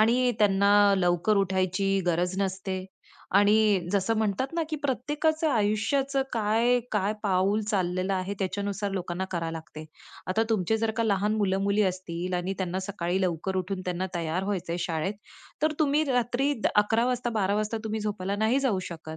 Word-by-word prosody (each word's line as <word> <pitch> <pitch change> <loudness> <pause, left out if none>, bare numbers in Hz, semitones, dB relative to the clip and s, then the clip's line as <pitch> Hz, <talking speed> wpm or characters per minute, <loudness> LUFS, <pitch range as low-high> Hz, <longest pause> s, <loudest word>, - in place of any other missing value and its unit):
आणि 245 +3 +3
त्यांना 200 0 +5
लवकर 180 +3 +2
उठायची 195 0 +1
गरज 175 +2 0
नसते 190 -1 -2 0.5
आणि 205 -2 +4
जसं 200 +3 +1
म्हणतात 215 +3 0
ना 335 - +1
की 310 - -1
प्रत्येकाचं 295 +4 0
आयुष्याचं 250 +5 +1
काय 230 +2 +2
काय 210 0 +1
पाऊल 195 +1 +2
चाललेलं 185 -2 -1
आहे, 185 +2 -2
त्याच्यानुसार 200 +1 -2
लोकांना 180 -1 -3
करावं 165 -2 -2
लागते. 155 -1 -8 0.4
आता 185 +5 +1
तुमचे 220 0 +1
जर 225 0 0
का 230 - +1
लहान 210 0 +1
मुलं-मुली 200 0 +1
असतील 185 -1 -2
आणि 180 +2 -1
त्यांना 185 -1 -2
सकाळी 185 -1 -2
लवकर 185 +1 -1
उठून 185 +1 -2
त्यांना 180 +1 -2
तयार 170 +2 -2
व्हायच 195 -3 -2
आहे 170 - -2
शाळेत, 170 +3 -2 0.5
तर 310 - +3
तुम्ही 300 -1 +3
रात्री 245 +3 +1 0.2
11:00 220 +3 +3
वाजता, 250 -1 -1
12:00 205 -3 0
वाजता 215 +2 -1
तुम्ही 220 0 -2
झोपायला 200 -2 -2
नाही 220 +5 +2
जाऊ 250 -8 +1
शकत. 160 -1 -8
200 Hz, 160 wpm, -27 LUFS, 185-220 Hz, 0.5 s, त्यांना